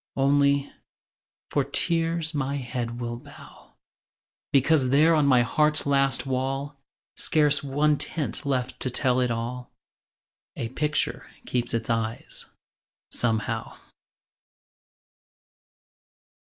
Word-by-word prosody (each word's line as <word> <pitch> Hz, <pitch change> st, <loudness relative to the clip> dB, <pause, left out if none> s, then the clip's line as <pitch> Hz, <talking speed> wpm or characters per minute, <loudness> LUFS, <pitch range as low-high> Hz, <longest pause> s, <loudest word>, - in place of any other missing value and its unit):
Only, 140 Hz, +1 st, +2 dB, 0.8 s
for -, -, +2 dB
tears 165 Hz, -1 st, 0 dB
my 140 Hz, -1 st, -1 dB
head 120 Hz, -3 st, -4 dB
will 120 Hz, -1 st, -4 dB
bow, 140 Hz, +3 st, -15 dB, 0.8 s
Because 140 Hz, -1 st, +3 dB
there 155 Hz, +5 st, +5 dB
on 150 Hz, -3 st, +3 dB
my 125 Hz, -3 st, +5 dB
heart's 150 Hz, +5 st, +2 dB
last 135 Hz, -1 st, +2 dB
wall, 135 Hz, +2 st, -2 dB, 0.4 s
Scarce 150 Hz, -2 st, +2 dB
one 145 Hz, +1 st, +1 dB
tint 150 Hz, -5 st, -3 dB
left 130 Hz, -3 st, -2 dB
to 130 Hz, -, -1 dB
tell 125 Hz, 0 st, +1 dB
it 125 Hz, -1 st, +1 dB
all, 120 Hz, +2 st, -4 dB, 0.9 s
A 115 Hz, -, -4 dB
picture 150 Hz, +4 st, -2 dB, 0.2 s
keeps 120 Hz, -1 st, -1 dB
its 115 Hz, 0 st, -2 dB
eyes, 115 Hz, 0 st, -4 dB, 0.6 s
somehow. 115 Hz, -1 st, -1 dB
135 Hz, 100 wpm, -26 LUFS, 120-145 Hz, 0.9 s, there